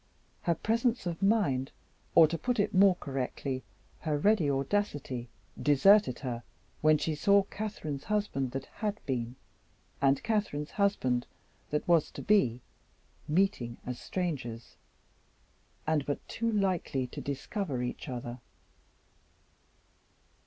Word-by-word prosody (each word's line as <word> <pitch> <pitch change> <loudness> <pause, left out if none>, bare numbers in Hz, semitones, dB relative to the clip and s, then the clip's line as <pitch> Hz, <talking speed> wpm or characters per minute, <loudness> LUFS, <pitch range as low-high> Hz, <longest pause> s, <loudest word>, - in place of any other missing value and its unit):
Her 170 - +1
presence 230 +4 0
of 170 0 -3
mind 195 - +2 0.4
or, 160 - +9
to 160 - -2
put 245 +7 -1
it 205 - +1
more 190 0 +6
correctly, 135 -2 -3 0.4
her 155 -3 -1
ready 190 -2 +3
audacity 135 - -1 0.3
deserted 150 - +5
her, 120 -4 -3 0.4
when 155 0 +5
she 155 +1 -1
saw 200 +6 +4
Catherine's 190 -9 -5
husband 205 -11 0
that 135 0 -3 0.2
had 210 -1 -1
been, 120 -2 -2 0.7
and 135 0 +3
Catherine's 205 -10 -1
husband 130 - +1 0.4
that 150 - -1
was 170 -3 +4
to - - -7
be, 125 - +3 0.7
meeting 150 -9 +1
as 125 -1 -4
strangers, 135 -11 -4 1.1
and 155 -2 +2
but 145 - -3
too 230 0 -1
likely 185 - 0
to 125 - -7
discover 140 - -3
each 125 +4 -5
other. 120 -1 -5
155 Hz, 120 wpm, -30 LUFS, 130-200 Hz, 1.1 s, or